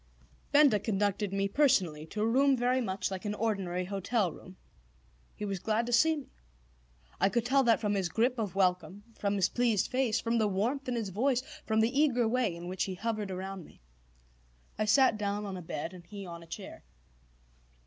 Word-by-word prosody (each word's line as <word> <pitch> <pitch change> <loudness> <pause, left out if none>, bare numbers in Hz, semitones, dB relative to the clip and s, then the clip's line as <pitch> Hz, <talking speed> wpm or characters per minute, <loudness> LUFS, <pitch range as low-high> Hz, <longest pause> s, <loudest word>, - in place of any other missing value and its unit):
Benda 285 -7 +5
conducted 205 -1 -1
me 195 0 0
personally 190 - +2
to 210 +5 -4
a - - +2
room 270 +3 +3
very 250 +2 +1
much 190 -4 -2
like 190 -1 -5
an 210 -1 -2
ordinary 195 -5 -1
hotel 200 0 -1
room. 185 +3 -13 0.8
He 210 - -5
was 195 -2 -3
glad 220 +4 0
to 240 - -3
see 320 +7 +5
me. 290 -3 -9 0.9
I 195 - +4
could 235 +2 0
tell 270 +3 +4
that 230 -1 +4
from 210 -2 0
his 190 -3 0
grip 240 +7 +1
of 205 -5 -3
welcome, 180 0 0 0.2
from 200 0 0
his 195 -3 +3
pleased 235 -5 +1
face, 255 -4 +1
from 230 0 0
the 215 - +3
warmth 235 +9 -1
in 245 - -1
his 225 -4 -2
voice, 250 +6 +1 0.2
from 220 0 +2
the 240 +5 +1
eager 250 -6 +3
way 235 -6 0
in 170 +1 -8
which 185 0 -2
he 190 - -5
hovered 215 0 -3
around 190 0 -5
me. - - -18 1.0
I 215 - -1
sat 225 0 +4
down 205 0 -2
on 195 -2 -5
a 180 - -6
bed 160 +1 -5
and 180 -1 -11
he 200 +2 -9
on 170 -1 -8
a 165 - -14
chair. - - -9
210 Hz, 200 wpm, -30 LUFS, 190-240 Hz, 1.0 s, Benda